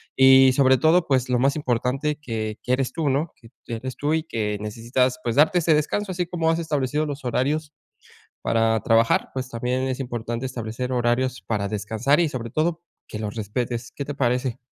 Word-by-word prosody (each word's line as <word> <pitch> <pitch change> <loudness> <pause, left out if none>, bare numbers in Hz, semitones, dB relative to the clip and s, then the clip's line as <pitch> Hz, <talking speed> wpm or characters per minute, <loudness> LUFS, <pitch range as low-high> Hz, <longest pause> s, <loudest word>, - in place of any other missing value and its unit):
y 130 0 +7
sobre 130 0 +4
todo, 165 +2 +4
pues, 130 -3 +1
lo 125 - +2
más 135 +2 +2
importante 135 +2 -1
que 110 -4 -4
que 125 - -2
eres 130 -1 0
tú, 160 -4 0
¿no?, 145 +5 -1
que 115 - -16 0.2
que 115 - -4
eres 125 +3 -6
tú 145 +2 0
y 160 - -1
que 105 -8 -2
necesitas, 120 +4 -1
pues, 115 -1 -1
darte 155 +5 +4
ese 160 -1 +3
descanso, 185 +6 -1
así 180 0 -1
como 165 -2 -1
has 165 +1 +1
establecido 150 -2 -1
los 145 -2 -6
horarios 145 +5 -1 0.7
para 115 -1 +2
trabajar, 115 0 +2
pues, 130 -1 -4
también 125 +2 -2
es 130 +1 -3
importante 120 -1 -4
establecer 125 0 -4
horarios 125 +1 0
para 105 -3 -2
descansar 110 - 0
y 165 - +1
sobre 115 -4 -5
todo, 165 +3 0 0.3
que - - -6
los 105 -2 -4
respetes, 115 +3 -3
¿qué 140 - -6
te 145 - -4
parece? 125 -2 0
130 Hz, 195 wpm, -23 LUFS, 115-145 Hz, 0.7 s, y